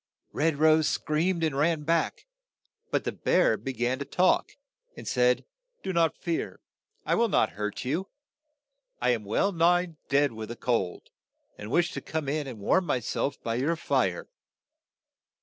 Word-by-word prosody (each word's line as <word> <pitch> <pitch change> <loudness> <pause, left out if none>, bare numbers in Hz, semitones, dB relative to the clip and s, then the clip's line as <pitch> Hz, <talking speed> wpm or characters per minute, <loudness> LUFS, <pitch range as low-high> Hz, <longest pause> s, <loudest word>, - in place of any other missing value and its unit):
Red 160 0 +1
Rose 155 0 +4
screamed 165 +3 0
and 155 -4 0
ran 155 +2 +1
back, 165 +2 0 0.6
but - - 0
the - - -2
bear - - +2
be 135 - -5
gan 125 +1 -1
to - - -2
talk, 185 +5 +2 0.4
and - - -9
said, 125 0 +2
' - - -59
' 485 - -45
Do 190 - -2
not 165 -2 +2
fear; 170 -2 -3 0.5
I - - +1
will 235 0 +3
not 110 - +2
hurt 105 +2 -4
you. 165 +9 -1 0.9
I 125 +1 +2
am 115 -4 -1
well 110 - +1
nigh 175 -1 +2
dead 140 0 +3
with 110 -1 -7
the 120 - -5
cold, 115 -8 -2 0.4
and 105 - -8
wish 170 +5 +2
to - - -5
come 155 -3 -4
in 145 0 -1
and 125 -4 -7
warm 170 - +1
my 125 - +1
self 135 +4 -2
by 115 - -1
your 140 +8 +1
fire." 165 - 0
150 Hz, 175 wpm, -28 LUFS, 125-170 Hz, 0.9 s, Rose